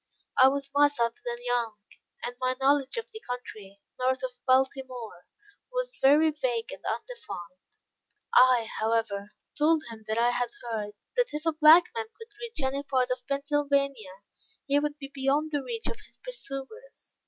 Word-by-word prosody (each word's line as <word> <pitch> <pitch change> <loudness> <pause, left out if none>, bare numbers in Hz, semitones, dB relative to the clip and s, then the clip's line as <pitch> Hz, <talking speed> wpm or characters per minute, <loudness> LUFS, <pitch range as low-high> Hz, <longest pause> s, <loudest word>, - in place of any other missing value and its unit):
I - - +10
was 275 +1 0
myself 285 -5 +3
then 240 0 -3
young, 240 -3 0 0.5
and 245 - -4
my 255 0 +1
knowledge 275 - +2
of 460 - -4
the 440 - -8
country, 215 - -8 0.2
north 260 0 +1
of 260 - -2 0.2
Baltimore, 255 -7 0 0.4
was - - -2
very 300 +4 +6
vague 245 -6 -2
and - - -10
undefined. 425 - -7 0.6
I, 250 -3 +6
however, 215 -2 -1 0.2
told 310 +1 +3
him, 220 -1 -10
that 220 +1 -1
I 240 +1 +4
had 245 0 0
heard, 215 -3 -3 0.2
that - - +1
if 305 +2 -4
a 325 - +2
black 310 +3 +8
man 450 -1 -2
could 450 -2 -13
reach 460 -9 -4
any 270 +1 0
part 260 -3 0
of 250 0 -3
Pennsylvania, 280 -7 0 0.5
he 285 0 +3
would 295 0 -2
be 275 -2 -8
beyond 280 +3 +1
the 290 -2 0
reach 460 - -5
of - - -3
his - - -12
pursuers. 485 - -7
270 Hz, 165 wpm, -28 LUFS, 240-300 Hz, 0.6 s, I